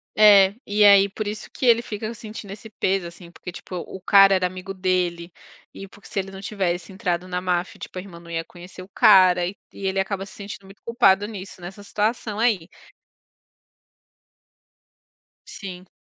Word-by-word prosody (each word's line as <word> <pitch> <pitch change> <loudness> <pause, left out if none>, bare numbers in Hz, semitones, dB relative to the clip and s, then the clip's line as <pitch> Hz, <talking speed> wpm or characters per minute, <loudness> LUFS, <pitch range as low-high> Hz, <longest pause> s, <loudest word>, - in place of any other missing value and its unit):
É, 200 -2 +7
e 210 +1 +2
aí 200 -1 +7
por 210 +2 -5
isso 210 +1 -6
que - - -4
ele 235 -1 +5
fica 215 -1 -5
sentindo 215 -2 -9
esse 215 +2 -10
peso, 195 -3 -1
assim, 170 0 -13
porque, 180 - -9
tipo, 180 - -9
o 180 +2 -7
cara 195 +1 +6
era 185 -1 +2
amigo 185 +1 -8
dele, 180 -2 -1 0.4
e 195 - -9
porque 200 +1 -17
se 220 - -9
ele 195 0 -5
não 195 0 -9
tivesse 185 -3 -3
entrado 180 -2 -2
na 180 0 -2
máfia, 180 0 -2
tipo, - - -9
a - - -5
irmã 180 -3 -12
não 170 0 -13
ia 165 0 -2
conhecer 180 +2 -13
o 185 - -11
cara, 180 -2 +5
e 190 +3 -5 0.2
e 195 - -8
ele 190 0 0
acaba 195 0 -2
se 195 - -14
sentindo 200 -1 -9
muito 195 +1 -16
culpado 205 -4 +3
nisso, 195 -3 -9
nessa 195 +4 -9
situação 215 +1 -2
aí. 215 -8 +1 2.8
Sim. 185 -2 -9
195 Hz, 185 wpm, -23 LUFS, 180-205 Hz, 2.8 s, É